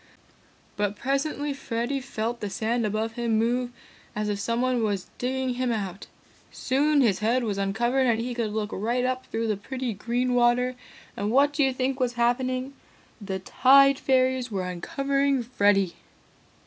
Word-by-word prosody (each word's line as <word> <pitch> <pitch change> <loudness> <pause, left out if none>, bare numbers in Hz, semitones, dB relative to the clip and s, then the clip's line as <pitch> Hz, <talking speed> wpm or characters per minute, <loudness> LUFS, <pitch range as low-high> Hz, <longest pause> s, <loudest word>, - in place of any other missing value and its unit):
"But 205 0 0
presently 280 +3 -1
Freddy 260 0 -2
felt 235 -2 -4
the 205 - -4
sand 225 +2 -1
above 215 +2 -2
him 230 -1 0
move 240 +2 +1 0.5
as 210 0 -1
if 205 -1 -2
someone 240 +3 0
was 205 -4 -2
digging 260 0 -1
him 250 0 -1
out. 195 -4 -4 0.4
Soon 285 +3 +2
his 210 -7 +2
head 235 +4 +1
was 205 -3 -2
uncovered 240 +7 +1
and 230 -2 +2
he 245 +2 -3
could 230 -3 -2
look 215 0 -3
right 240 +5 0
up 255 0 -2
through 225 0 -2
the 215 - +1
pretty 255 +3 -4
green 240 +5 -1
water, 245 +1 +3 0.4
and 205 - -2
what 280 +5 +4
do 290 0 +2
you 265 - +3
think 260 +1 -2
was 250 -2 0
happening? 255 +2 0 0.5
The 195 -2 -3
Tide 275 +7 +5
Fairies 260 -1 +1
were 195 -4 -2
uncovering 275 - 0
Freddy! 200 -6 +2
240 Hz, 160 wpm, -26 LUFS, 215-260 Hz, 0.5 s, Tide